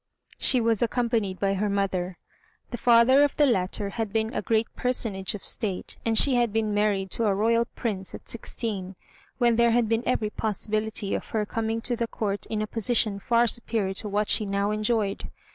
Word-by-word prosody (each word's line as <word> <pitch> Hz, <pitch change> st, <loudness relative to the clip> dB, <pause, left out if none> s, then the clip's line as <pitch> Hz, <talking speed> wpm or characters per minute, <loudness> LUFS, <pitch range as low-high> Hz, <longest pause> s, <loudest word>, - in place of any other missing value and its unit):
She 255 Hz, -, +4 dB
was 225 Hz, -2 st, +1 dB
accompanied 230 Hz, -5 st, 0 dB
by 195 Hz, -1 st, +1 dB
her 205 Hz, +2 st, -1 dB
mother. 190 Hz, -3 st, -1 dB, 0.5 s
The 240 Hz, -, -4 dB
father 240 Hz, +4 st, +5 dB
of 290 Hz, -, 0 dB
the 295 Hz, -, +5 dB
latter 200 Hz, -4 st, 0 dB
had 220 Hz, -2 st, -3 dB
been 220 Hz, +2 st, -1 dB
a -, -, -1 dB
great 225 Hz, -1 st, +1 dB
personage 215 Hz, -6 st, 0 dB
of 200 Hz, -, -8 dB
State, 200 Hz, -6 st, -2 dB
and 225 Hz, -1 st, +1 dB
she 275 Hz, -, +5 dB
had 240 Hz, -3 st, +2 dB
been 215 Hz, -1 st, 0 dB
married 205 Hz, -2 st, 0 dB
to 230 Hz, -, 0 dB
a 200 Hz, -2 st, +2 dB
Royal 230 Hz, +3 st, +2 dB
Prince 195 Hz, -5 st, -3 dB
at -, -, -12 dB
sixteen, 205 Hz, -5 st, -4 dB, 0.4 s
when 235 Hz, -2 st, +3 dB
there 235 Hz, 0 st, +4 dB
had 235 Hz, 0 st, +2 dB
been 225 Hz, +1 st, +1 dB
every 215 Hz, -4 st, 0 dB
possibility 215 Hz, 0 st, -2 dB
of -, -, -4 dB
her 215 Hz, -2 st, -1 dB
coming 225 Hz, +1 st, -2 dB
to 240 Hz, +1 st, -1 dB
the 235 Hz, 0 st, -2 dB
Court 205 Hz, -3 st, -3 dB
in 215 Hz, -1 st, -2 dB
a -, -, -1 dB
position 220 Hz, -1 st, 0 dB
far 235 Hz, +3 st, +2 dB
superior 225 Hz, -4 st, -1 dB
to 210 Hz, +2 st, -2 dB
what 205 Hz, +1 st, 0 dB
she -, -, +3 dB
now 200 Hz, +1 st, 0 dB
enjoyed. 215 Hz, -1 st, -1 dB
220 Hz, 195 wpm, -26 LUFS, 200-235 Hz, 0.5 s, father